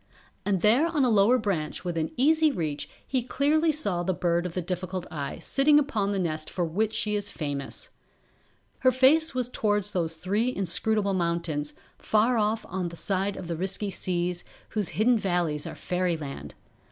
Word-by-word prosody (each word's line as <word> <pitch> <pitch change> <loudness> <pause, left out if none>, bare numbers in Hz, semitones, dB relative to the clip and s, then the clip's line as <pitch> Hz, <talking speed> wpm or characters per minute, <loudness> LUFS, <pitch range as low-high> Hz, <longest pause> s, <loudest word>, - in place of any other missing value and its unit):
And 195 -4 +1
there 245 +10 +5
on 305 -5 +1
a 245 - +2
lower 215 +4 +5
branch 190 -9 -2
within 165 -3 -1
easy 310 +4 +4
reach 155 - -3 0.2
he 260 -2 0
clearly 295 +6 +2
saw 200 - -1
the 180 +1 -1
Bird 175 0 0
of 170 - -9
the 180 - 0
Difficult 180 +1 -4
Eye 140 -3 -4
sitting 290 +2 +3
upon 225 -9 +1
the 200 - -1
nest 155 -4 -2
for 175 - -1
which 205 +7 0
she 215 -1 0
is 205 -1 -2
famous. 145 -3 -5 0.9
Her 255 - +5
face 270 +4 +4
was 250 -2 0
towards 210 -4 0
those 165 -3 -1
three 205 +9 -1
inscrutable 200 +2 +1
mountains, 170 -4 -1 0.2
far 225 +3 +2
off 215 +1 0
on 185 -1 -3
the - - -13
other - - -7
side 195 +2 -1
of 180 - -7
the 170 - -2
risky 195 +4 -1
seas, 175 -1 -2 0.3
whose 210 -5 -1
hidden 230 +2 +2
valleys 175 -6 -1
are - - -7
Fairyland. 170 -6 -3
195 Hz, 175 wpm, -27 LUFS, 170-230 Hz, 0.9 s, there